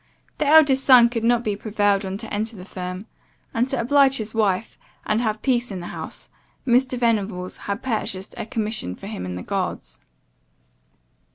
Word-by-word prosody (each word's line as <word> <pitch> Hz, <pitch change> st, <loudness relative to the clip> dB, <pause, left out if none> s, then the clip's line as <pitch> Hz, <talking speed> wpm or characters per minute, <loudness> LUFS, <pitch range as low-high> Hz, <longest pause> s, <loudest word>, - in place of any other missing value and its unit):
The 300 Hz, -, +1 dB
eldest 285 Hz, -3 st, +6 dB
son 245 Hz, -3 st, +7 dB
could 230 Hz, -2 st, -3 dB
not 240 Hz, 0 st, +3 dB
be 210 Hz, -3 st, -1 dB
prevailed 205 Hz, -1 st, +1 dB
on 190 Hz, +1 st, -4 dB
to -, -, -7 dB
enter 220 Hz, +2 st, -2 dB
the 185 Hz, -2 st, -10 dB
firm; 185 Hz, +1 st, -6 dB, 0.5 s
and, 240 Hz, +3 st, +1 dB
to 270 Hz, -, -1 dB
oblige 270 Hz, +2 st, +4 dB
his 220 Hz, -1 st, -4 dB
wife, 215 Hz, -2 st, 0 dB, 0.3 s
and 215 Hz, +2 st, +1 dB
have 215 Hz, -2 st, -2 dB
peace 245 Hz, -2 st, +1 dB
in 195 Hz, -3 st, -5 dB
the 175 Hz, -, -7 dB
house, -, -, -8 dB, 0.4 s
Mr. 255 Hz, +1 st, +2 dB
Venables 205 Hz, -6 st, 0 dB
had 200 Hz, +2 st, -2 dB
purchased 210 Hz, -6 st, -3 dB
a -, -, -5 dB
commission 215 Hz, -, -2 dB
for -, -, -12 dB
him 200 Hz, -, -5 dB
in 90 Hz, -, -5 dB
the 90 Hz, -, -6 dB
guards. -, -, -4 dB
220 Hz, 180 wpm, -23 LUFS, 200-245 Hz, 0.5 s, son